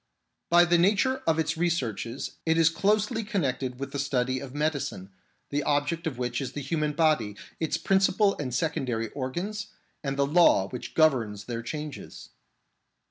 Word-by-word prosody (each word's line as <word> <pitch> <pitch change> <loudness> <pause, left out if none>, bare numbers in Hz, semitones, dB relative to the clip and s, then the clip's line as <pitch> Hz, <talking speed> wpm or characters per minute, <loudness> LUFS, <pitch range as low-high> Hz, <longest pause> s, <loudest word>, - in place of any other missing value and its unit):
By 175 +1 +6
the 175 0 +3
nature 215 +9 +2
of 160 -1 +3
its 160 0 0
researches 130 - -2
it 160 0 +2
is 165 -1 +5
closely 210 +5 +1
con 200 -4 -1
nected 130 -1 -2
with 140 +1 -5
the 140 - -3
study 130 -2 0
of 135 0 -9
medicine, 145 -10 -2 0.4
the 145 +1 0
object 145 +4 0
of 140 -6 -4
which 120 0 -2
is 130 -2 -5
the 145 - -4
human 150 +2 -1
body, 150 -10 +2 0.2
its 160 - 0
principal 195 +1 +3
and 135 -4 -3
secondary 125 -6 -1
organs, 180 +10 -4 0.4
and 135 -1 -2
the 140 - +3
law 150 - +4
which 125 - -7
governs 120 -10 +2
their 115 -2 -4
changes. 150 +5 -7
145 Hz, 165 wpm, -27 LUFS, 130-170 Hz, 0.4 s, By